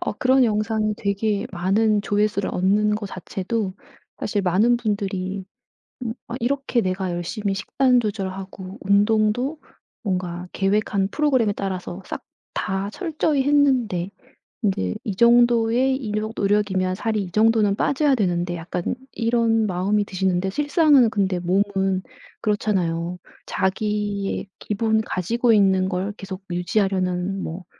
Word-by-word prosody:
어 - - -2
그런 255 +4 +3
영상이 215 -1 0
되게 205 +1 -1
많은 205 +4 +2
조회수를 205 -1 0
얻는 205 +3 +2
거 210 -1 -4
자체도 190 +2 -3 0.5
사실 205 -1 -1
많은 205 +7 +3
분들이 200 -4 -2 0.6
음. 225 - -3
'아 235 - -5
이렇게 260 -1 0
내가 185 -1 -2
열심히 195 +4 -2
식단 250 +5 +2
조절하고 195 -2 -5
운동도 215 +8 +2 0.4
뭔가 180 -2 -3
계획한 200 0 +1
프로그램에 260 -8 +2
따라서 190 -1 -4
싹 - - -6 0.3
다 195 +2 -2
철저히 310 - 0
했는데 255 -11 +2 0.5
인제 185 - 0
이 200 -3 -3
정도의 240 +2 +4
이뇩 215 -3 -3
노력이면 195 -2 +1
살이 215 -1 -1
이 180 - -8
정도는 215 -1 +3
빠져야 280 +4 +2
되는데.' 175 -4 0
약간 170 +5 -3 0.2
이런 230 -1 +2
마음이 200 +3 +1
드시는데 190 -1 0
실상은 290 - +4
근데 190 -4 0
몸은 190 +1 +1 0.4
그렇잖아요. 180 -5 -1 0.3
자기의 200 0 -1
기본 220 +1 0
가지고 230 +5 0
있는 190 -2 +3
걸 190 +2 -2
계속 195 -1 -8
유지하려는 185 0 0
뭐 175 +3 -6
205 Hz, 285 characters per minute, -23 LUFS, 190-225 Hz, 0.6 s, 정도의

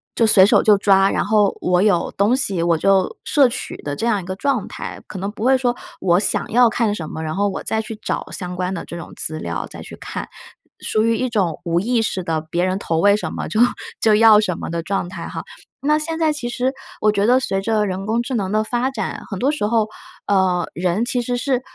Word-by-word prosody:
就 230 - +3
随 195 -3 +7
手 - - +4
就 210 -2 +5
抓， 195 -1 +4
然 - - 0
后 205 -1 +2
我 180 0 +2
有 200 -5 +2
东 205 +4 +2
西 200 -10 +1
我 170 -1 +2
就 190 +3 +2
摄 280 -4 +4
取 245 - -5
的 145 - -3
这 185 - -3
样 210 -4 +1
一 - - -11
个 185 +1 -5
状 260 -6 0
态。 - - -7
可 190 - -8
能 195 +2 -3
不 210 +1 -7
会 260 +2 +4
说 245 -2 0 0.2
我 175 -2 +3
想 205 - 0
要 245 +1 +5
看 220 -2 0
什 160 -6 -6
么， 160 - -6
然 155 -1 -3
后 200 +1 +1
我 - - -5
再 220 0 -1
去 220 - -7
找 - - -4
相 180 -2 -5
关 180 +1 -2
的 170 - -5
这 - - -8
种 170 - -9
资 155 0 -1
料 - - -4
再 - - -10
去 - - -10
看。 - - -6 0.5
属 215 - +1
于 230 0 +2
一 255 +3 -1
种 190 -8 -1
无 170 -1 +1
意 235 +4 +1
识 190 -4 -2
的 160 -2 -1
别 170 +3 -1
人 185 +1 -1
投 165 -4 -2
喂 200 +3 +5
什 210 - -4
么 - - -4
就 215 - -2 0.4
就 220 -1 +4
要 220 -1 +7
什 190 -5 -1
么 - - -6
的 170 0 -2
状 190 +1 -2
态 170 -2 -7
哈。 - - -6 0.4
那 300 +2 +2
现 320 +1 -3
在 320 -2 +2
其 245 -5 -4
实 255 +2 -1 0.3
我 215 - +4
觉 205 0 +1
得 250 +2 +5
随 195 -6 -1
着 215 +1 +1
人 195 0 -4
工 230 +2 +1
智 260 - -5
能 195 -4 -1
的 215 +1 +2
发 240 +4 -1
展， - - -4
很 195 - -4
多 270 +7 +2
时 300 -9 -1
候， 220 -1 +1 0.4
呃， 190 -3 +1
人 180 +5 0
其 245 0 0
实 245 +1 -2
是 255 0 0
205 Hz, 270 characters per minute, -20 LUFS, 185-235 Hz, 0.5 s, 随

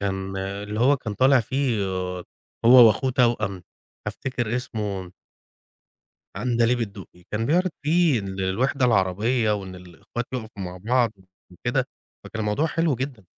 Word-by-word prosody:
كان 95 -1 -3
اللي 100 +3 -4
هو 140 +4 +5
كان 110 -5 -5
طالع 130 +3 +5
فيه 125 -3 0
آآ، 90 -1 -3 0.4
هو 120 0 +9
وأخوه 115 +5 +2
توأم، 115 -7 +1 0.4
أفتكر 120 -3 -2
اسمه 105 -6 -4 1.3
عندليب 120 0 +1
الدقي، 100 -5 -7
كان 110 +2 -1
بيعرض 180 +6 +2
في 160 -2 +3
الوحدة 100 +7 -1
العربية، 110 +2 +2
وإن 95 -2 -6
الأخوات 90 +6 -7
يقفوا 110 -5 -5
مع 90 0 -6
بعض 115 +4 +1 0.4
وكده، 120 +8 -1 0.4
فكان 110 - -6
الموضوع 105 +9 +1
حلو 165 -2 +1
جدًا. 125 -4 -5
110 Hz, 130 wpm, -24 LUFS, 95-130 Hz, 1.3 s, هو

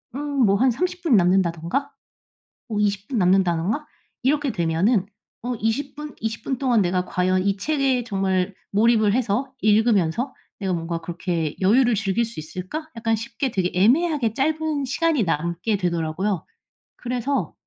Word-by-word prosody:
음 285 -3 +1
뭐 200 0 +4
한 260 +3 +4
30 360 +8 -2
분 265 -11 +4
남는다든가? 180 - +1 0.8
어 215 - -4
20 205 -1 0
분 250 -5 -1
남는다든가? 185 - +2 0.4
이렇게 290 0 +2
되면은 180 +4 +1 0.4
'어 250 0 -1
20 250 +6 -1
분? 300 -1 -7
20 225 0 -3
분 265 -3 -2
동안 245 -6 +3
내가 180 0 0
과연 185 +1 +1
이 200 0 +2
책에 275 -2 +1
정말 195 -3 0 0.2
몰입을 215 0 +4
해서 255 +2 0
읽으면서 215 - +2 0.3
내가 190 -2 -1
뭔가 165 0 -3
그렇게 170 -3 -3
여유를 240 +5 +4
즐길 210 +3 0
수 225 -9 -7
있을까?' 185 - -6
약간 225 0 0
쉽게 230 +3 -3
되게 180 -2 0
애매하게 245 - +3
짧은 310 0 0
시간이 305 -1 +1
남게 170 +6 -1
되더라고요. 170 +1 -1 0.5
그래서 250 +3 -2
215 Hz, 290 characters per minute, -23 LUFS, 185-265 Hz, 0.8 s, 뭐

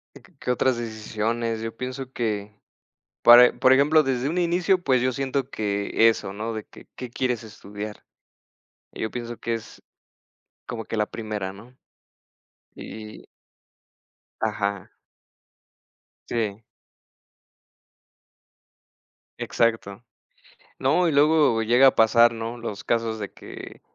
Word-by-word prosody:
Y - - -12
q - - -23
qué 125 - -1
otras 125 0 +1
decisiones, 115 0 -3
yo 115 0 -5
pienso 130 +1 -6
que 105 -3 -3 0.6
para 120 +1 +9
por 130 0 +6
ejemplo, 150 +4 +5
desde 130 0 -1
un 170 - -3
inicio, 180 +2 +2
pues, 130 -3 +2
yo 130 +1 +1
siento 135 0 -2
que 105 +1 +2
eso, 100 -3 -3
¿no?, 110 +3 -4
de 110 -1 -5
que, - - -17
¿qué 125 -2 -7
quieres 125 -3 -1
estudiar? 105 -1 -9 0.9
y - - -8
yo 110 - -2
pienso 120 -1 -6
que 115 - -3
es 115 -1 -7 0.8
como 115 -2 -6
que - - -5
la 105 - +2
primera, 105 -4 -5
¿no? 115 +6 -15 1.0
Y 110 -1 -9 1.2
Ajá. 100 -3 -2 1.4
Sí. 110 -2 -2 2.8
Exacto. 115 -3 -1 0.8
No 155 +7 +2
y - - +2
luego 145 -5 +4
llega 125 +4 +6
a - - +3
pasar, 115 +1 +5
¿no? 115 +1 -5
Los 110 -4 -6
casos 115 -1 -1
de 100 - -5
que, - - -11
115 Hz, 125 wpm, -24 LUFS, 110-130 Hz, 2.8 s, para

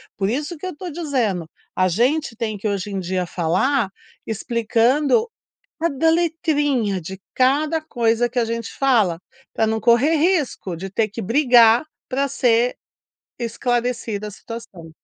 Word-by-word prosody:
Por 195 0 -1
isso 295 +8 -2
que 340 - -8
eu 370 - -5
tô 355 +3 -7
dizendo, 245 - -1 0.3
a 185 0 +3
gente 245 - +1
tem 220 -2 -3
que 210 - -3
hoje 200 0 -2
em 195 - -2
dia 185 0 -2
falar 190 - 0 0.4
explicando 235 - +1 0.5
cada 325 -1 +2
letrinha 295 - +1
de 190 +3 -8
cada 295 +5 +2
coisa 240 -5 +1
que 245 +1 -4
a 235 - +2
gente 230 0 -4
fala, 220 -11 +2 0.3
para - - +1
não 220 0 -1
correr 240 +8 +4
risco 305 - 0
de 190 +3 -6
ter 215 +3 0
que 220 +2 -6
brigar 240 +1 +5 0.2
para 275 +2 0
ser 245 -2 +2 0.6
esclarecida 235 -2 -2
a - - -6
situação. 210 -8 -10
235 Hz, 150 wpm, -21 LUFS, 210-285 Hz, 0.6 s, brigar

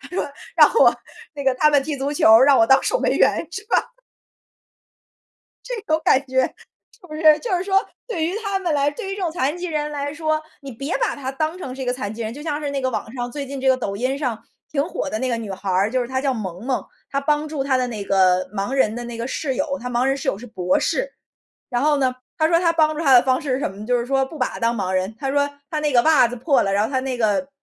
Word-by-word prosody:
他 - - -12
说， 360 - -2 0.3
让 - - +7
我 - - +6 0.4
那 280 -1 -6
个 265 -1 +3
他 300 - +4
们 285 -2 +3
踢 295 0 -3
足 275 +1 -2
球， 225 -5 +6
让 275 0 +6
我 225 - +5
当 265 - +5
守 - - +1
门 - - +1
员， - - +2
是 390 +5 -6
吧。 - - +1 1.8
这 - - -4
种 315 0 +2
感 265 - +5
觉， 260 0 +2
是 460 -8 -16
不 305 - -8
是 320 - -6 0.2
就 435 -7 -1
是 355 - -3
说， 390 0 +3 0.3
对 340 -9 -2
于 355 +5 -2
她 395 -1 -1
们 345 -5 -1
来 285 0 +2
对 395 -1 -6
于 - - -3
这 400 - -6
种 340 -3 -1
残 295 +1 -1
疾 360 - -5
人 300 -2 -2
来 285 0 -3
说， 310 0 -1 0.2
你 275 -1 -8
别 275 +8 -4
把 480 -4 0
她 265 -1 -5
当 310 +5 -2
成 265 -8 -7
是 265 - -7
一 - - -3
个 250 - 0
残 220 -5 -4
疾 230 - -7
人。 220 +1 -4
就 290 - -9
像 300 -2 -3
是 290 - -2
那 275 -1 -2
个 260 - 0
网 225 - -4
上， 245 -1 -4
最 285 0 -5
近 275 0 -6
这 265 - 0
个 260 -1 +4
抖 200 -5 -3
音 255 +5 -1
上 250 -6 -3 0.3
挺 280 -1 0
火 300 - -4
的 215 - -2
那 260 - -1
个 235 - 0
女 220 -3 -6
孩 190 0 -4
儿， 195 +4 +2
就 255 -1 +1
是 240 - -4
她 260 0 -1
叫 275 -2 +1
萌 190 -3 -6
萌， 260 -2 -1 0.2
她 275 - -1
帮 300 +1 0
助 295 -3 -3
她 265 -2 +1
的 250 -1 0
那 215 -4 -5
个 185 -1 +3
盲 200 +5 -3
人 245 -5 +2
的 240 - -5
那 235 -1 -7
个 230 - -3
室 265 -1 -2
友， 280 -1 -1
她 250 +1 -5
盲 245 +1 +1
人 270 0 +2
室 280 0 -6
友 195 - +1
是 245 - -10
博 185 -5 0
士。 - - -1 0.6
然 245 +1 -1
后 300 0 +3
呢， 260 -2 +1 0.2
她 315 0 +3
说 335 0 +4
她 335 -2 +3
帮 310 -2 +2
助 325 - -3
她 275 -3 +4
的 245 - +9
方 260 +3 +1
式 275 -5 -1
是 - - -1
什 - - -1
么 195 - -13
呢？ 210 - -7
就 245 -1 +2
是 235 - -3
说 270 0 +2
不 305 +3 -10
把 255 - +1
她 - - -9
当 230 +1 +1
盲 190 -4 -2
人， 185 +3 -1
她 270 -1 -2
说 285 0 +1 0.2
她 305 -2 -2
那 300 -2 0
个 240 - +6
袜 310 -7 +5
子 245 - -6
破 275 +4 +2
了， 195 - -1
然 205 +2 +2
后 225 - -3
她 260 - 0
那 260 -1 -3
个 220 +5 +1
270 Hz, 315 characters per minute, -21 LUFS, 240-305 Hz, 1.8 s, 的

